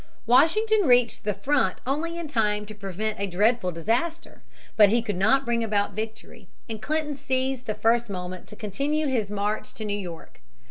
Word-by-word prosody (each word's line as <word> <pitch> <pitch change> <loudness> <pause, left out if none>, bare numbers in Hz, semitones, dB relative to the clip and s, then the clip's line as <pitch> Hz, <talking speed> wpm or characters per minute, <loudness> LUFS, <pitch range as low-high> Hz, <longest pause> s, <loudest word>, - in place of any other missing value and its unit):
Washington 405 - +4
reached 245 -4 +3
the 210 - +1
front 235 -3 +1
only 320 +6 -2
in 340 -2 -4
time 210 -6 0
to 215 - -9
prevent 210 +1 -4
a 200 - -1
dreadful 205 +1 +2
disaster. 240 - -2 0.3
But 210 -2 +7
he 230 +2 +2
could 205 -3 -2
not 225 +9 +3
bring 235 -1 0
about 205 -2 0
victory, 220 -2 -7 0.2
and 220 -2 -6
Clinton 310 +1 -1
seized 260 -1 -2
the 215 - -1
first 230 0 +2
moment 180 -1 -6
to - - -11
continue 280 +10 -1
his 240 -7 0
march 205 +1 -2
to 220 - -5
New 205 - -2
York. 175 -4 -9
225 Hz, 180 wpm, -25 LUFS, 205-270 Hz, 0.3 s, But